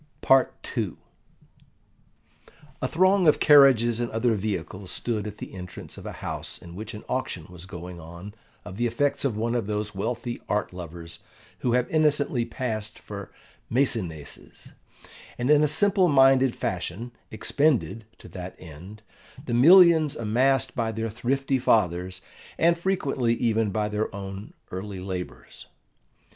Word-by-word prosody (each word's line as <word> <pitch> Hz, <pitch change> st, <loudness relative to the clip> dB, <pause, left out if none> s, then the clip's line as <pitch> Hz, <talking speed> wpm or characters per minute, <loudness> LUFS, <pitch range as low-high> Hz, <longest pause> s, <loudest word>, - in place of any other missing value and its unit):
PART 135 Hz, -1 st, +4 dB, 0.2 s
II -, -, -1 dB, 1.9 s
A 130 Hz, -, 0 dB
THRONG 185 Hz, +3 st, +3 dB
of 150 Hz, -, +5 dB
carriages 130 Hz, -6 st, +6 dB
and 120 Hz, -1 st, -1 dB
other 115 Hz, +1 st, +1 dB
vehicles 95 Hz, -2 st, -4 dB
stood 110 Hz, -3 st, -2 dB
at 105 Hz, 0 st, -8 dB
the -, -, -9 dB
entrance 90 Hz, -2 st, -9 dB
of -, -, -9 dB
a -, -, -4 dB
house -, -, -4 dB
in 85 Hz, -, -12 dB
which 110 Hz, +4 st, -7 dB
an 105 Hz, -, -9 dB
auction 95 Hz, -10 st, -3 dB
was 90 Hz, 0 st, -11 dB
going 90 Hz, -1 st, -8 dB
on 85 Hz, +5 st, -10 dB, 0.3 s
of 95 Hz, +2 st, -8 dB
the 120 Hz, +1 st, +1 dB
effects 140 Hz, +5 st, 0 dB
of 125 Hz, -6 st, -1 dB
one 115 Hz, +2 st, -1 dB
of 120 Hz, -5 st, -1 dB
those 105 Hz, 0 st, -2 dB
wealthy 120 Hz, +4 st, -4 dB
art 105 Hz, -2 st, -1 dB
lovers 85 Hz, -1 st, -9 dB, 0.4 s
who 120 Hz, -, 0 dB
have 125 Hz, 0 st, +2 dB
innocently 150 Hz, -6 st, +2 dB
passed 110 Hz, -3 st, -4 dB
for 100 Hz, -2 st, -9 dB, 0.4 s
Maecenases, 95 Hz, -, -2 dB, 0.7 s
and 125 Hz, +4 st, +1 dB
in 150 Hz, 0 st, +6 dB
a -, -, +4 dB
simple 190 Hz, +4 st, +3 dB
minded 135 Hz, -3 st, +5 dB
fashion 95 Hz, +6 st, -4 dB, 0.2 s
expended, 115 Hz, -3 st, 0 dB
to -, -, -14 dB
that 90 Hz, -1 st, -8 dB
end, 90 Hz, +7 st, -12 dB, 0.4 s
the -, -, -3 dB
millions 160 Hz, +3 st, +7 dB
amassed 130 Hz, +4 st, +1 dB
by 115 Hz, -3 st, -1 dB
their 115 Hz, 0 st, -3 dB
thrifty 135 Hz, +4 st, 0 dB
fathers, 90 Hz, -6 st, +1 dB, 0.4 s
and 170 Hz, +1 st, +4 dB
frequently 140 Hz, -10 st, 0 dB
even 115 Hz, -2 st, +1 dB
by 105 Hz, +1 st, -1 dB
their 105 Hz, +1 st, -2 dB
own 100 Hz, +1 st, -7 dB, 0.2 s
early 95 Hz, +1 st, -5 dB
labours. 90 Hz, -9 st, -7 dB
115 Hz, 145 wpm, -26 LUFS, 95-135 Hz, 1.9 s, millions